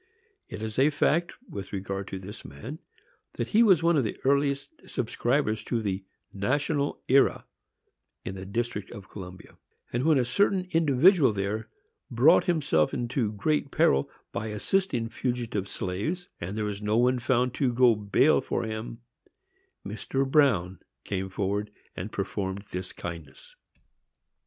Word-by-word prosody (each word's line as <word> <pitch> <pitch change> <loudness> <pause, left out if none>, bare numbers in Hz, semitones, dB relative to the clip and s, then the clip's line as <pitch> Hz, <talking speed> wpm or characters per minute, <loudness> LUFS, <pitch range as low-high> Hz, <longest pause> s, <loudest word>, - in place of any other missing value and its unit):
It 110 - -6
is 110 +2 -3
a 140 +3 +6
fact, 155 +3 +1
with 100 -2 -7
regard 100 0 -4
to 95 - -5
this 95 +3 -9
man, 110 - -8 0.5
that - - -3
he 225 - +4
was 190 -8 +5
one 170 -1 +4
of 135 - +3
the 110 - -3
earliest 140 - 0
subscribers 120 -2 0
to 120 - 0
the 100 -3 -2 0.3
National 140 +7 -1
Era, 135 +1 +4 0.8
in 95 - -4
the 95 0 -7
District 110 -1 -3
of 100 -1 -11
Columbia; 90 -2 -10 0.3
and, 120 +1 0
when 155 -1 +4
a 125 - +2
certain 190 +6 +2
individual 160 - +5
there 100 +2 -3 0.4
brought - - +5
himself 145 - +2
into 120 -2 -1
great 140 +8 0
peril 70 - +3 0.2
by 110 - -3
assisting 115 - 0
fugitive 120 -5 -2
slaves, 130 - -3
and 95 +5 -5
there 105 - -1
was 105 0 -4
no 105 +1 +1
one 125 +1 +3
found 125 0 +1
to 130 -3 +1
go 120 0 +5
bail 105 -1 +3
for - - -2
him, 110 +1 -5 0.8
Mr. 135 +6 -2
Bruin 105 - +3 0.2
came 95 -1 -3
forward 100 +2 -2 0.3
and 95 +4 -5
performed 100 0 -3
this 90 0 -5
kindness. 85 -6 -9
115 Hz, 145 wpm, -27 LUFS, 100-140 Hz, 0.8 s, a